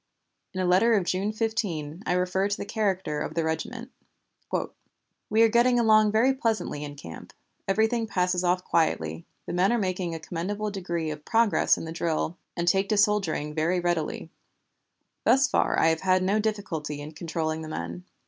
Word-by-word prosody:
In -, -, -2 dB
a 185 Hz, -, +1 dB
letter 190 Hz, +6 st, +4 dB
of 200 Hz, -, +2 dB
June 190 Hz, +4 st, 0 dB
15 195 Hz, -8 st, -2 dB
I -, -, +2 dB
refer 180 Hz, +2 st, +1 dB
to 205 Hz, -, -2 dB
the -, -, -5 dB
character 190 Hz, -8 st, -1 dB
of 155 Hz, -, -4 dB
the 165 Hz, -, +1 dB
regiment: 230 Hz, +11 st, -4 dB, 1.4 s
"We 220 Hz, +2 st, +4 dB
are -, -, +7 dB
getting 240 Hz, +2 st, +3 dB
along 215 Hz, -2 st, +5 dB
very 235 Hz, +5 st, +3 dB
pleasantly 225 Hz, -, -2 dB
in 145 Hz, -1 st, -7 dB
camp; 85 Hz, -, -10 dB, 0.3 s
everything 220 Hz, +3 st, +1 dB
passes 180 Hz, -2 st, 0 dB
off 180 Hz, +1 st, +1 dB
quietly; 80 Hz, -, 0 dB, 0.2 s
the -, -, -5 dB
men 185 Hz, +4 st, +3 dB
are 240 Hz, -, +2 dB
making 185 Hz, -4 st, -2 dB
a -, -, -5 dB
commendable 200 Hz, +6 st, -3 dB
degree 170 Hz, -5 st, -3 dB
of 150 Hz, 0 st, -8 dB
progress 230 Hz, +1 st, +3 dB
in -, -, -6 dB
the 160 Hz, -, -6 dB
drill, 165 Hz, 0 st, -1 dB, 0.2 s
and 170 Hz, 0 st, -1 dB
take 195 Hz, +2 st, +2 dB
to 215 Hz, -, +2 dB
soldiering 195 Hz, -8 st, +1 dB
very 165 Hz, +4 st, +1 dB
readily. 175 Hz, -2 st, -2 dB, 0.9 s
Thus 270 Hz, +1 st, +4 dB
far -, -, +1 dB
I 160 Hz, -, +5 dB
have 160 Hz, 0 st, 0 dB
had 185 Hz, -1 st, +3 dB
no 200 Hz, +3 st, +2 dB
difficulty 190 Hz, -9 st, -3 dB
in 145 Hz, +1 st, -7 dB
controlling 160 Hz, 0 st, -3 dB
the 155 Hz, -, -7 dB
men. 85 Hz, -, -5 dB
185 Hz, 180 wpm, -26 LUFS, 160-215 Hz, 1.4 s, are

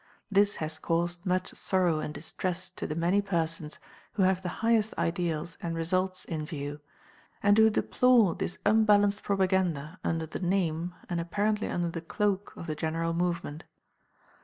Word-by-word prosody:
This 200 Hz, +1 st, +4 dB
has 155 Hz, 0 st, -2 dB
caused 170 Hz, +2 st, -1 dB
much 185 Hz, 0 st, 0 dB
sorrow 180 Hz, -4 st, +1 dB
and 150 Hz, -, -3 dB
distress 180 Hz, +4 st, -3 dB
to -, -, -5 dB
the 155 Hz, -, -3 dB
many 175 Hz, +5 st, +2 dB
persons 165 Hz, -5 st, -2 dB, 0.4 s
who 200 Hz, -, +1 dB
have 185 Hz, 0 st, +3 dB
the 180 Hz, -, -3 dB, 0.2 s
highest 225 Hz, -2 st, +3 dB
ideals 165 Hz, -1 st, -2 dB
and 165 Hz, -1 st, -3 dB
results 185 Hz, +3 st, -1 dB
in 155 Hz, -2 st, -3 dB
view, 145 Hz, -2 st, -5 dB, 0.6 s
and 205 Hz, 0 st, +6 dB
who 220 Hz, 0 st, +6 dB
deplore 235 Hz, -2 st, +4 dB
this -, -, -4 dB
unbalanced 205 Hz, -1 st, +4 dB
propaganda 185 Hz, -5 st, 0 dB
under 165 Hz, -1 st, -1 dB
the 155 Hz, -, -6 dB
name, 175 Hz, -2 st, 0 dB
and 175 Hz, -, -2 dB
apparently 205 Hz, +5 st, 0 dB
under 175 Hz, -1 st, -1 dB
the 165 Hz, 0 st, -5 dB
cloak 200 Hz, +3 st, -1 dB
of -, -, -7 dB
the 155 Hz, -, -2 dB
general 165 Hz, +2 st, -1 dB
movement. 170 Hz, -3 st, -2 dB
175 Hz, 160 wpm, -29 LUFS, 165-200 Hz, 0.6 s, and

